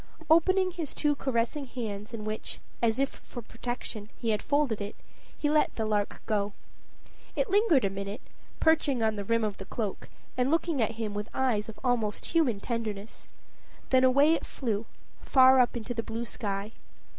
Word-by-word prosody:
Opening 370 +3 +5
his 335 -5 -5
two 295 -1 +2
caressing 265 +1 -1
hands, 215 -4 -5
in 225 -3 -5
which, 215 0 -3 0.2
as 230 -1 +2
if 275 +1 -1
for 240 - -8
protection, 225 -2 -6
he 230 -2 0
had 210 - 0
folded 285 -7 +1
it, 205 +1 -5 0.4
he 295 - 0
let 300 0 +2
the 220 - -1
lark 210 -1 -1
go. 205 -1 0 0.8
It - - 0
lingered 385 - +4
a - - +2
minute, 200 +2 -5 0.4
perching 300 -7 +3
on 220 -1 +2
the 205 - -3
rim 230 +2 +1
of 210 -2 -1
the 195 - -6
cloak, 210 -1 -4 0.3
and 250 +1 +1
looking 325 -3 +1
at 225 +1 +1
him 220 -2 -3
with 210 +2 -4
eyes 230 -5 +1
of 220 - -10
almost 230 -5 0
human 285 -11 +2
tenderness; 220 -2 -4 0.6
then 260 0 +5
away 280 +5 +6
it - - -1
flew, 225 -4 -3 0.3
far 260 0 +6
up 245 -1 +3
into 235 +2 -4
the 230 - -1
blue 230 +1 -4
sky. 205 -2 -3
230 Hz, 180 wpm, -29 LUFS, 215-275 Hz, 0.8 s, away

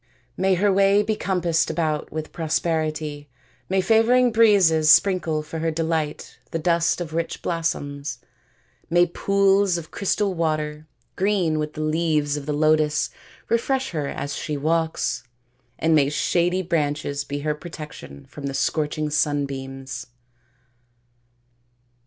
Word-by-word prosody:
" - - -38
May 190 0 +2
her 200 +2 +2
way 200 +1 +4
be 215 +1 -1
compassed 175 -5 0
about 155 -3 -1
with 155 0 -5
prosperity. 155 -2 -2 0.4
May 190 0 +2
favouring 235 +4 +4
breezes 195 -9 +4
sprinkle 165 -3 +4
for 160 +1 -6
her 165 +1 0
delight 160 -1 -2
the - - -2
dust 170 +1 +1
of 160 -2 -5
rich 165 0 -3
blossoms. 145 -5 -3 0.7
May 175 +1 +5
pools 195 +1 +2
of 160 -2 -8
crystal 200 0 0
water, 155 -2 -2 0.3
green 185 -6 +1
with 150 0 -3
the 155 - -5
leaves 155 -2 +1
of 145 -1 -6
the - - 0
lotus, 155 0 +2 0.4
refresh 265 +3 0
her 150 -4 -2
as 145 +1 -4
she 150 -2 -3
walks; 160 0 0 0.5
and 160 0 +2
may 140 -3 +4
shady 175 +4 +1
branches 145 -4 -1
be 145 0 -5
her 150 +1 0
protection 150 - -10
from 140 - -7
the 135 - -4
scorching 150 +2 -1
sunbeams." 135 -4 -2
160 Hz, 135 wpm, -23 LUFS, 150-180 Hz, 0.7 s, May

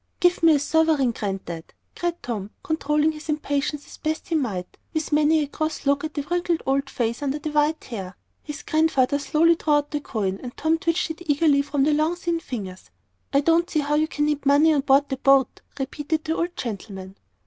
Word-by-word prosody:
"Give 355 -1 +3
me 325 -2 +6
a - - +2
sovereign, 305 -3 +2
Granddad," 190 -6 -5 0.2
cried 345 -1 -3
Tom, 210 -5 -4
controlling 300 -1 +1
his 305 0 -11
impatience 295 -1 -1
as - - -13
best 315 0 -3
he - - -1
might, 210 - -2 0.2
with 315 0 -2
many 305 +1 +4
a - - -4
cross 310 +1 -3
look 280 +1 +2
at 310 -1 -5
the 290 - -2
wrinkled 345 +2 -1
old 275 +1 0
face 235 +1 -2
under 285 0 -1
the 300 +1 -5
white 300 +1 +1
hair. 195 -6 -7 0.2
His 295 -1 -8
Grandfather 290 -3 +2
slowly 325 +3 +3
drew 315 -2 0
out 290 0 +1
the 295 -1 -2
coin, 195 -7 -2
and 245 -1 -8
Tom 320 +1 +1
twitched 335 -1 0
it 325 +1 -10
eagerly 290 -1 +4
from 280 -1 0
the 300 +2 +3
long, 310 +3 +1
thin 345 -1 -2
fingers. 195 - -7 0.4
"I 280 - +3
don't 335 +3 +2
see 310 - +1
how 290 +1 -1
you 305 +1 +2
can 295 -2 -1
need 295 -1 -1
money 290 +3 +5
on 285 - +2
board 275 +1 +4
the 265 - -3
boat," 275 -1 +3 0.2
repeated 295 +3 -2
the 320 +1 -1
old 345 +1 -2
gentleman. 195 -4 -6
295 Hz, 210 wpm, -24 LUFS, 270-315 Hz, 0.4 s, me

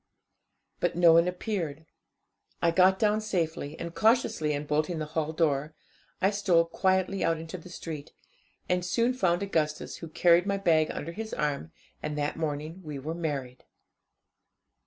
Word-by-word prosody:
But - - 0
no 170 -1 +6
one 170 +1 +5
appeared; 180 -5 -3 0.7
I 170 - +3
got 185 +2 +5
down 215 0 +2
safely, 160 -7 -2
and, 170 0 -5
cautiously 220 -9 +2
unbolting 150 +3 -1
the 155 - -2
hall 160 -1 0
door, 155 -2 0 0.4
I 195 - +3
stole 185 -5 +3
quietly 190 +2 +1
out 165 0 +2
into 165 +3 -7
the 175 - -13
street, 160 -3 -7 0.6
and 180 0 +1
soon 230 +8 +1
found 185 -7 +1
Augustus, 155 -6 -1
who 165 - -8
carried 170 +3 +4
my 200 0 +1
bag 160 -5 +3
under 165 - -5
his 220 +5 -5
arm, 140 - -2 0.3
and 150 -1 -4
that 145 0 -1
morning 155 +2 -4
we 150 -4 -6
were 150 +4 -4
married. 140 -7 -4
165 Hz, 155 wpm, -28 LUFS, 155-185 Hz, 0.7 s, no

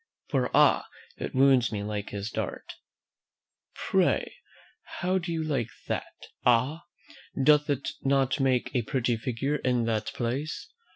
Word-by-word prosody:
"'For, - - +1
ah! - - +5 0.3
it - - -5
wounds 130 -3 +5
me 105 -2 -3
like 105 -1 -4
his 100 +2 -5
dart.' - - -4 1.0
"Pray - - +1 0.7
how 185 +1 +2
do 175 -1 -5
you 165 -1 -1
like 135 -7 -1 0.2
that - - -4 0.3
Ah! 130 +7 +2 0.6
doth 150 +1 +5
it 140 -1 -1
not 135 -1 +2
make 130 -2 +1
a 125 - +2
pretty 120 0 0
figure 130 +5 -2
in 125 -3 +1
that 110 -2 -1
place? 130 +6 -3
130 Hz, 135 wpm, -28 LUFS, 115-145 Hz, 1.0 s, ah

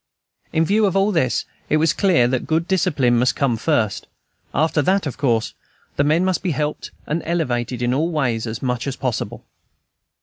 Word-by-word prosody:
In 160 +1 +2
view 210 +4 +3
of 190 - -2
all 195 +2 +3
this, 160 - +1 0.2
it 155 - +3
was 160 +1 +2
clear 175 -12 +3
that 130 0 -2
good 160 +2 0
discipline 145 -10 +2
must 125 +1 +2
come 135 -4 +1
first; 115 -4 0 0.4
after 155 +1 +1
that, 190 +5 +1
of 140 - -4
course, 115 -5 +1 0.4
the 140 - +2
men 155 +5 +2
must 185 -1 0
be 190 - -1
helped 150 0 -2 0.2
and 160 +3 -2
elevated 125 -7 -1
in 120 +1 +1
all 155 +6 +1
ways 125 -8 -1
as 110 +2 -5
much 125 0 -1
as 135 - -2
possible. 130 -4 -4
145 Hz, 190 wpm, -21 LUFS, 125-165 Hz, 0.4 s, view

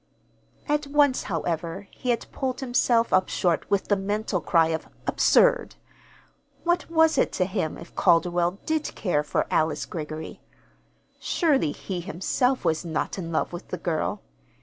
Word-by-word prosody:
At 295 -1 0
once, 285 -2 +3
however, 170 +2 -3
he 250 - -6
had 235 - +1
pulled 260 -2 -3
himself 245 -2 +2
up 185 0 +3
short 175 -3 0
with 200 -1 +1
the 205 - +3
mental 205 -1 -2
cry 165 -2 +3
of 160 -1 -3 0.2
"Absurd!" - - +3 0.9
What 345 0 0
was 320 -1 +4
it - - +2
to 185 - +1
him 170 -4 -2
if 170 - -12
Calderwell 175 +2 +2
did 315 -1 -1
care 175 -7 0
for 150 - -1
Alice 160 0 +1
Greggory? 155 -1 -6 0.8
Surely 290 - +1
he 180 +3 -5
himself 230 +8 0
was 160 +1 +1
not 165 +3 -3
in 165 -2 -5
love 160 - -1
with 175 - -7
the - - -4
girl. 170 +4 -2
190 Hz, 150 wpm, -25 LUFS, 165-260 Hz, 0.9 s, was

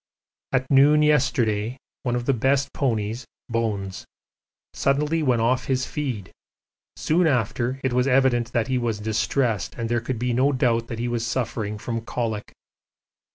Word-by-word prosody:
At 130 -1 +1
noon 145 +3 +6
yesterday 125 -6 +1 0.2
one 120 -2 -1
of 120 0 -2
the 135 - +3
best 135 +3 +1
ponies, 115 -2 -1 0.2
'Bones,' 105 -5 -2 0.7
suddenly 150 +4 +1
went 125 -6 +2
off 125 +2 +1
his 130 -1 0
feed 125 - -4 0.6
soon 170 +2 +2
after 125 -1 0
it 130 -2 0
was 125 +1 +2
evident 125 -3 +3
that 120 -1 0
he 130 -1 0
was 115 -3 -1
distressed 110 0 0
and 115 -1 -3
there 120 -1 +1
could 120 +1 -3
be 125 +1 -1
no 135 +4 +3
doubt 115 -3 +1
that 115 - -5
he 120 +1 -2
was 120 -1 -1
suffering 115 -4 -2
from 115 +2 -4
colic. 115 -2 -3
120 Hz, 155 wpm, -24 LUFS, 115-135 Hz, 0.7 s, noon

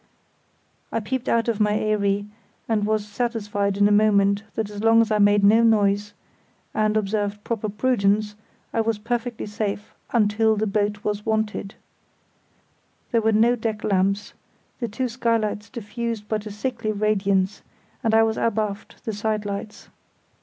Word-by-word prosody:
I - - 0
peeped 250 +4 -3
out 230 0 +2
of 225 -2 0
my 210 -1 +3
eyrie 205 -1 0 0.4
and 210 -2 +1
was 215 -1 0
satisfied 205 -3 -1
in 205 0 +5
a - - +1
moment 200 -1 +4
that 215 -2 -2
as 205 0 -6
long 225 0 +6
as 225 -1 +2
I 210 - +2
made 205 0 +4
no 215 +3 +6
noise, 205 -2 +2 0.6
and 215 0 +1
observed 205 0 -1
proper 220 -2 -2
prudence, 210 -2 +1 0.4
I 225 - +2
was 225 -1 0
perfectly 235 +2 -3
safe 210 -1 -4 0.2
until 220 -1 +2
the 215 +1 0
boat 205 0 -1
was 210 0 -2
wanted. 220 -2 -2 1.4
There 230 -2 +3
were 220 0 +2
no 230 +3 +4
deck 220 -2 -3
lamps; 195 0 0 0.5
the 240 - -2
two 250 +4 -2
skylights 225 -4 -1
diffused 230 -2 -5
but 215 0 -2
a - - -6
sickly 230 +1 -3
radiance, 200 -2 +1 0.4
and 220 -1 +2
I 225 - +6
was 225 0 0
abaft 215 -2 -2
the 220 - -2
side 210 0 -2
lights. 200 +1 -6
215 Hz, 155 wpm, -23 LUFS, 205-225 Hz, 1.4 s, long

